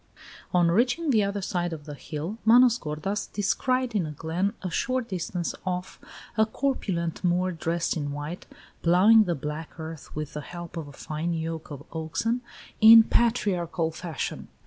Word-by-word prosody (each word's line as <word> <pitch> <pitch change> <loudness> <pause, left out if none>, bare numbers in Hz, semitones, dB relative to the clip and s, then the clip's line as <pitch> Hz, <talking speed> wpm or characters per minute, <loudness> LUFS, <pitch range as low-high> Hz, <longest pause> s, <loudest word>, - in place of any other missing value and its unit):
XI. - - -22 0.3
On 175 -1 +4
reaching 250 - +2
the 220 -4 +4
other 200 0 -2
side 175 -2 -1
of 150 -2 -8
the 150 - -7
hill 155 +9 -6
Manos 240 +1 +6
gordas 155 +7 -3
descried 255 +4 0
in 190 -7 0
a - - -5
glen, 165 +7 -2
a 185 - -3
short 255 +6 -1
distance 180 -2 -3
off, 180 -1 -4 0.4
a 220 - +4
corpulent 195 - -2
Moor 180 +1 +2
dressed 170 0 -1
in 145 -3 -3
white, 145 +5 -6 0.3
ploughing 205 +6 +6
the 175 -2 0
black 150 +4 -6
earth 160 -1 -8
with 150 -1 -4
the 150 - -4
help 175 +3 -9
of 160 -3 -5
a - - -10
fine 155 +4 -3
yoke 160 0 -4
of 145 -1 -8
oxen, 165 +10 -1 0.4
in 225 +1 +10
patriarchal 185 -9 +1
fashion. 165 -2 -5
175 Hz, 170 wpm, -26 LUFS, 160-215 Hz, 0.4 s, in